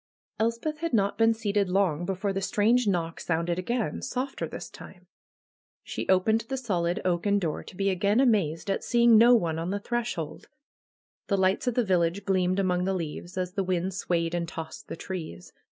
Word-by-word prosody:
Elspeth 235 +8 -1
had 335 -3 -3
not 200 -3 +2
been 225 0 +4
seated 205 -3 0
long 180 -3 +1
before 195 +1 -1
the 195 - -2
strange 225 +5 +2
knock 170 -4 -1
sounded 170 +1 -1
again, 235 +5 -2
softer 260 +2 -3
this - - -7
time. - - -13 0.8
She - - -5
opened 205 +4 +3
the 265 - -2
solid 180 -8 -1
oaken 185 +3 +2
door 165 -6 -2
to - - -12
be 195 +1 +1
again 200 +5 +2
amazed 195 - +2
at - - -2
seeing 235 -1 +5
no 235 +3 +7
one 165 -7 0
on 165 +2 -3
the 200 +1 -1
threshold. 230 -9 -4 0.8
The 200 - +1
lights 190 +5 +1
of 245 - +1
the 245 - +2
village 180 +1 +1
gleamed 185 -1 +1
among 180 -2 +1
the 190 0 0
leaves, 175 +2 -5
as 180 -1 -2
the 195 0 -1
wind 185 0 -1
swayed 170 -3 -1
and 170 -1 -1
tossed 160 -1 -8
the - - -6
trees. 160 - -7
190 Hz, 185 wpm, -27 LUFS, 175-220 Hz, 0.8 s, no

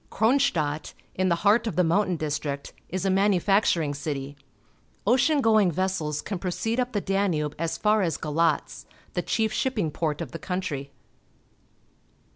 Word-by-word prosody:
Kronstadt, 180 - +1 0.2
in 185 0 +1
the 170 - +3
heart 220 +3 +4
of 195 - -3
the 180 - +3
mountain 185 +2 +2
district, 150 -2 -3 0.2
is 185 +1 -3
a 195 - +2
manufacturing 195 -5 +2
city. 140 -1 -4 0.7
Ocean 265 +7 +3
going 220 -5 +4
vessels 165 -4 -1
can 195 -3 -4
proceed 225 +6 -2
up 250 0 -1
the 205 - 0
Danube 185 -7 0
as 165 0 -1
far 215 0 +3
as 165 -5 0
Galatz 160 +2 -1
— - - -30
the - - 0
chief 220 -1 0
shipping 215 - 0
port 155 -1 -2
of 165 -7 -5
the - - -6
country. 150 -7 -3
180 Hz, 155 wpm, -26 LUFS, 155-210 Hz, 0.7 s, heart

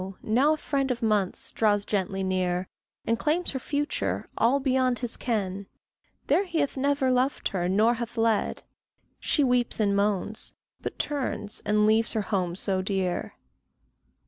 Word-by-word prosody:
now 260 +8 +3
a - - -11
friend 275 -2 -1
of 240 -2 -2
months 210 -4 0
draws 205 -2 +2
gently 195 -1 -1
near, 185 -1 0 0.4
And 230 0 +1
claims 330 +4 0
her 265 - -3
future 290 +3 -2
all 250 +5 +3
beyond 260 -2 +2
his 245 -1 -3
ken 200 -5 -2 0.6
There 400 - +3
he 345 -3 -3
hath 285 -2 0
never 275 -1 +1
loved 255 +2 +1
her 180 -2 -1
nor 215 +5 +4
hath 235 0 -5
led: 225 -2 +1 0.6
She 295 - +2
weeps 245 -3 +2
and 200 -2 +2
moans, 205 +2 0 0.3
but - - -5
turns, 265 -7 -3
and 210 0 +3
leaves 220 +1 +3
her 220 - +1
home 185 -4 -1
so 190 0 -1
dear. 190 -2 -2
225 Hz, 155 wpm, -27 LUFS, 200-260 Hz, 0.6 s, nor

